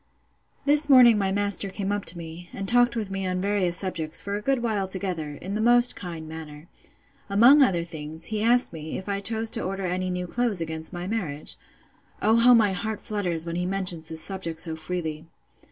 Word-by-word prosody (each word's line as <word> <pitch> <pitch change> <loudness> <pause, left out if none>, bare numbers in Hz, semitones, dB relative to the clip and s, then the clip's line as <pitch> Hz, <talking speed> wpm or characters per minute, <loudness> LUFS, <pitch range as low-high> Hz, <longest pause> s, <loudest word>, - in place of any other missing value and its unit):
This 295 +1 +4
morning 245 -5 +7
my 195 -1 0
master 200 0 -1
came 195 +1 -3
up 205 -1 -2
to 175 - +2
me, 170 +1 -9
and 195 0 -5
talked 245 +1 +4
with 215 -4 -3
me 195 -1 -2
on 185 0 -1
various 190 -3 0
subjects, 165 -4 -3
for 200 0 -4
a 205 - -3
good 265 +1 0
while 210 -4 0
together, 180 -6 -3
in 190 +6 -7
the 215 - -1
most 240 +1 +4
kind 170 -4 -7
manner. 155 0 -9 0.6
Among 240 +9 +7
other 180 -10 +3
things, 160 -1 -6
he 210 - -1
asked 240 -2 +3
me, 155 -1 -6
if 190 - -8
I 200 -1 -1
chose 225 +2 -1
to 230 - 0
order 195 +1 -3
any 185 +1 -1
new 180 0 -3
clothes 230 +1 -1
against 160 -1 -4
my 175 -1 -5
marriage. 180 -9 -2 0.6
(O 220 +2 +3
how 245 +1 +7
my 210 -4 +3
heart 220 +3 -3
flutters 180 -6 -2
when 170 0 -3
he 180 0 -1
mentions 180 -4 -1
this 160 -1 -5
subject 170 -4 -5
so 165 -1 -3
freely!) 160 -1 -5
190 Hz, 205 wpm, -25 LUFS, 165-215 Hz, 0.6 s, morning